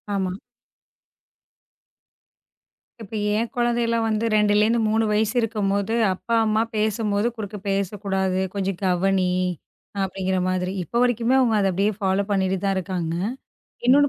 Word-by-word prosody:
ஆமா. 185 -2 -1 2.7
இப்ப 220 - -11 0.2
என் 230 +2 0
குழந்தையல்லாம் 235 -1 +1
வந்து 220 +1 0
2லருந்து 210 +2 +3
3 220 +1 +2
வயசு 215 0 +1
இருக்கும்போது, 205 -1 -1 0.2
"அப்பா 230 +5 -2
அம்மா 215 0 +2
பேசும்போது 215 0 0
குறுக்க 210 -1 -6
பேசக்கூடாது! 195 -1 -1
கொஞ்சம் 195 -2 -2
கவனி" 185 0 +2 0.7
அப்படிங்குற 190 0 -1
மாதிரி. 185 0 -1
இப்ப 235 +7 -2
வரைக்குமே 245 0 +2
அவுங்க 240 -4 +3
அத 195 - +2
அப்படியே 200 +4 +1
ஃபாலோ 195 0 +1
பண்ணீட்டு 190 -1 +1
தான் 195 - +1
இருக்காங்க. 175 -3 -2 0.7
இன்னொன்னு 285 +3 +6
205 Hz, 120 wpm, -23 LUFS, 190-225 Hz, 2.7 s, இன்னொன்னு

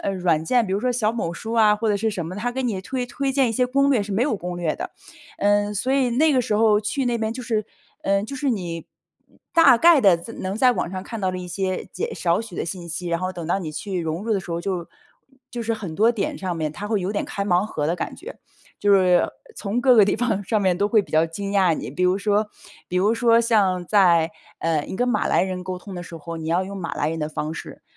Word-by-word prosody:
呃， 200 - -1
软 175 -4 +1
件， 235 +5 +2
比 190 - -3
如 200 - 0
说 250 +1 +1
小 230 -3 +1
某 170 -8 -3
书 220 +6 -6
啊， 215 -2 +4
或 225 +1 -1
者 205 - +2
是 225 +2 0
什 185 -5 -4
么， 170 +3 -6
它 230 +5 -2
给 260 +1 -3
你 215 -6 -1
推 250 +5 -3
推 270 +2 -2
荐 265 -2 +2
一 - - -3
些 250 +3 +2
攻 275 +2 +2
略， 240 -6 +3
是 200 0 -5
没 220 +5 +1
有 285 - +1
攻 180 -1 -5
略 170 -3 -1
的。 365 +2 -6 0.5
嗯， 205 0 +2
所 250 +6 -1
以 270 -2 +3
那 295 +6 +3
个 255 - +3
时 220 -3 -1
候 215 -1 +4
去 235 +6 -2
那 240 -1 0
边 220 0 -1
就 255 - -6
是 220 -3 -1 0.4
嗯， 195 +1 +2
就 250 - -7
是 275 +1 -2
你 175 -6 -4 0.7
大 330 -8 +7
概 330 0 +6
地 195 -6 +6
在 170 +7 -10
能 190 +2 -4
在 250 +2 +5
网 175 - -2
上 185 -1 -5
看 225 +2 -7
到 190 -1 +1
的 185 - -5
一 180 0 -6
些 185 +1 -2
简 465 +1 -3
少 170 +3 +1
许 225 -6 -9
的 - - -2
信 175 0 -6
息， 170 +2 -4
然 170 0 -1
后 185 0 -1
等 170 -3 -6
到 175 - +1
你 165 -5 -5
去 185 +3 -4
融 165 +4 -3
入 225 - 0
的 195 - +1
时 175 - -10
候， 170 - -2
就 180 -3 -3 0.6
就 240 - -5
是 230 0 -1
很 195 -8 -6
多 220 +5 +4
点 230 -4 -3
上 185 -3 -3
面 155 -2 -2
他 205 +4 -6
会 210 -3 +1
有 190 +3 -2
点 205 - -1
开 200 - -3
盲 185 0 +2
盒 150 -8 -2
的 165 - +1
感 - - -5
觉。 - - -10 0.4
就 205 - +2
是 180 -2 +4 0.3
从 210 +3 -3
各 250 0 +5
个 215 -4 +6
地 200 - +1
方， 220 -4 0
上 210 +2 0
面 185 -2 +2
都 205 - +2
会 215 -1 +4
比 - - -16
较 160 +1 +4
惊 200 +5 -5
讶 190 -4 +3
你， - - -6
比 145 +7 -3
如 180 +1 +3
说 205 +1 +1 0.4
比 180 - -2
如 205 +5 +3
说 230 -1 +4
像 200 -6 +2
在， 175 -4 +4 0.3
呃， 165 -2 +1
你 - - -5
跟 245 - +1
马 240 -4 +1
来 - - +3
人 185 -1 -3
沟 185 0 -4
通 190 +2 -10
的 175 - -5
时 170 -1 -9
候， 165 +1 -7
你 160 0 -5
要 175 +3 +1
用 200 - -7
马 170 - -4
来 150 - -1
人 165 - -4
的 150 0 -2
方 155 0 -4
式， 165 - -9
200 Hz, 300 characters per minute, -23 LUFS, 180-230 Hz, 0.7 s, 大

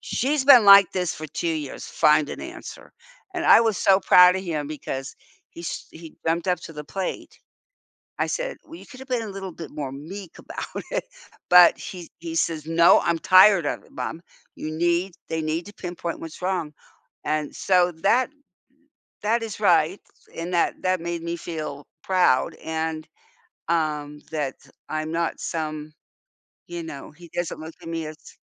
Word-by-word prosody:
"She's 275 +2 -1
been 250 -6 +8
like 200 -2 +9
this 180 -3 -1
for 155 - -7
2 170 +3 -3
years, 155 -4 -4
find 150 -1 +3
an - - -6
answer," - - -10 0.4
and 345 - -2
I - - +8
was 225 -3 +1
so 195 0 +4
proud 180 0 +7
of 190 - -4
him 155 -4 -3
because 135 -3 -5 0.4
he 170 - -11
s 165 - -5
he 160 -1 -12
jumped 170 +3 0
up 180 - +1
to 165 - -10
the 150 -1 -8
plate. 190 +4 -5 0.8
I - - +2
said, - - -3
"Well, 325 +1 -11
you - - -13
could 255 -2 -13
have 265 - -11
been 245 -2 0
a 220 - -6
little 195 -1 -6
bit 165 -2 -9
more 145 -3 -4
meek 170 +6 -9
about - - -7
it," - - 0 0.5
but 180 -1 +8
he 180 -3 -8
he 165 -1 -5
says, 160 -2 0
"No, 165 +1 +6
I'm 170 -1 0
tired 185 -3 +6
of - - -2
it - - -22
mom 165 - -5 0.3
you 155 - -5
need 175 +3 0
they 160 -1 -2
need 160 +4 -2
to 205 - -10
pinpoint 175 -1 -5
what's 165 +1 -9
wrong." 180 -5 -1 0.5
And, 150 0 -2
so, 180 -2 +2
that 250 +7 +3 0.9
that 230 +2 +1
is 215 -2 -6
right 180 -2 +3 0.4
and 170 +2 -5
that 170 - +1
that 185 -2 +1
made 170 -1 -3
me 170 0 -3
feel 155 -4 -6 0.2
proud 180 -9 +2
and, 160 0 -3 0.6
um, 150 -3 -1
that 145 -4 -2 0.3
I'm 155 0 -2
not 170 0 -1
some 155 -1 -4 0.7
you 175 -1 -6
know, 145 -4 -8
he 170 +2 -15
doesn't 175 -1 -3
look 160 +1 -8
at 165 - -9
me 165 -1 -3
as 155 0 -12
170 Hz, 180 wpm, -24 LUFS, 155-185 Hz, 0.9 s, like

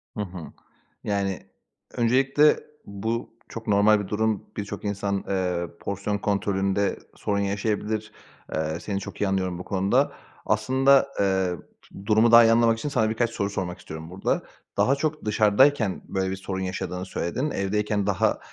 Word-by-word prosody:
Hı 105 - -2
hı. 95 -2 -8 0.7
Yani, 100 -2 -2 0.5
öncelikle 135 +5 +3 0.3
bu 110 +4 -3 0.2
çok 115 0 -8
normal 105 +1 +5
bir 100 - -4
durum. 110 0 0
Birçok 105 0 -5
insan, 100 -1 -1
eee, 90 -3 -1
porsiyon 100 +1 -2
kontrolünde 100 -1 0 0.2
sorun 100 -1 -1
yaşayabilir. 105 +1 -2 0.4
Eee, 80 +1 -2
seni 100 -2 -3
çok 100 - -8
iyi 105 - +2
anlıyorum 95 -2 -1
bu - - -5
konuda. 95 +1 +1 0.3
Aslında, 135 +1 +4
eee, 100 - +3 0.7
d 95 - -11
durumu 110 +2 +4
daha 115 0 +10
iyi 115 - +5
anlamak 115 0 +4
için 130 +6 -3
sana 110 -6 +1
birkaç 115 +1 0
soru 100 -3 -2
sormak 90 -3 -4
istiyorum 80 +1 -8
burada. 95 +2 -1 0.3
Daha 135 - +4
çok 150 -1 -2
dışarıdayken 110 +1 +3
böyle 95 -1 -1
bir - - -2
sorun 95 0 -5
yaşadığını 95 -1 -4
söyledin. 125 - -2
Evdeyken 105 0 -1
daha, 105 +2 +1
100 Hz, 150 wpm, -25 LUFS, 95-110 Hz, 0.7 s, daha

